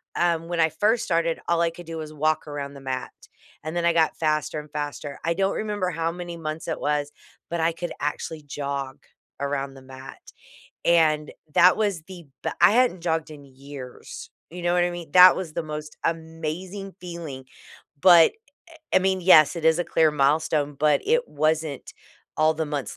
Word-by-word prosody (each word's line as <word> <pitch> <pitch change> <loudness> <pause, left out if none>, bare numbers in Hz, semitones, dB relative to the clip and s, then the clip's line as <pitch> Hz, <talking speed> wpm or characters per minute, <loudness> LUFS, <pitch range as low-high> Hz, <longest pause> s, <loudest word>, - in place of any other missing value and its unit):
um, 170 -1 +1
when 175 -1 -2
I 160 - +4
first 210 +9 +1
started, 165 -1 0
all 170 -1 +2
I 170 0 +2
could 175 +1 -12
do 165 0 -6
was 155 -1 -7
walk 155 +1 0
around 140 -1 -5
the 140 - -11
mat, 130 -1 -4 0.5
and 155 +2 -5
then 175 - 0
I 170 - +5
got 160 -1 +2
faster 155 -1 0
and 150 -1 -17
faster. 145 -1 -5
I 170 - +2
don't 195 +2 0
remember 205 -4 -2
how 165 0 -1
many 175 0 -7
months 155 -1 -5
it - - -3
was, 145 0 -1 0.4
but 170 - -2
I 165 +1 +2
could 175 +1 -5
actually 150 +1 -4
jog 140 -2 -4 0.4
around 140 -1 -2
the 135 - -13
mat, 130 0 -11 0.7
and 155 -3 +3 0.2
that 180 +1 +6
was 205 -6 -1
the 180 -4 -11 0.2
b - - 0
I 175 +4 +7
hadn't 240 -6 +2
jogged 160 -2 -1
in 145 -2 -11
years, 135 -1 -10 0.2
you 175 +1 -8
know 175 0 +1
what 175 - +3
I 175 - 0
mean? 175 -3 -8
That 180 0 +9
was 180 -4 -5
the 170 - -2
most 150 -1 -7
amazing 165 +4 -4
feeling, 170 -7 -7 0.6
but, 170 -2 +7 0.4
eh, - - -14 0.2
eh, - - +4
I - - +9
mean, 190 0 +1
yes, 165 -4 +7
it 165 - -5
is 160 +1 +4
a - - -1
clear 160 -2 +3
milestone, 145 +1 +1
but 150 +1 +2
it 480 +3 +2
wasn't 155 -1 -1 0.4
all 155 0 +4
the 160 0 -2
months 145 -6 -4
160 Hz, 195 wpm, -24 LUFS, 150-175 Hz, 0.7 s, That